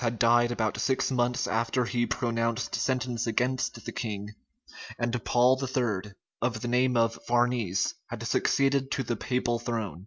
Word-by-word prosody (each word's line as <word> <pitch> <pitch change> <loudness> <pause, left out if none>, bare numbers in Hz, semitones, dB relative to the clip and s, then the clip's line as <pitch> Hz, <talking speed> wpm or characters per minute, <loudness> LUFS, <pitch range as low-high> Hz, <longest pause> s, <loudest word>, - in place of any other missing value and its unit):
had 115 -1 -1
died 120 +1 +4
about 110 -3 -1
six 130 0 +1
months 125 0 +1
after 115 +2 0
he 120 0 0
pronounced 115 0 -1
sentence 125 -3 -1
against 125 +3 -1
the - - -4
king; 105 -4 -4 0.7
and 120 -1 -1
Paul 125 +2 +3
III., 110 -7 -1 0.3
of 115 -3 -1
the 120 - -3
name 125 +1 +2
of 115 0 +2
Farnese, 120 -6 +1
had - - -6
succeeded 135 -1 +2
to 135 - -1
the 120 - -2
papal 120 0 -1
throne. 110 -8 -3
120 Hz, 155 wpm, -28 LUFS, 115-125 Hz, 0.7 s, died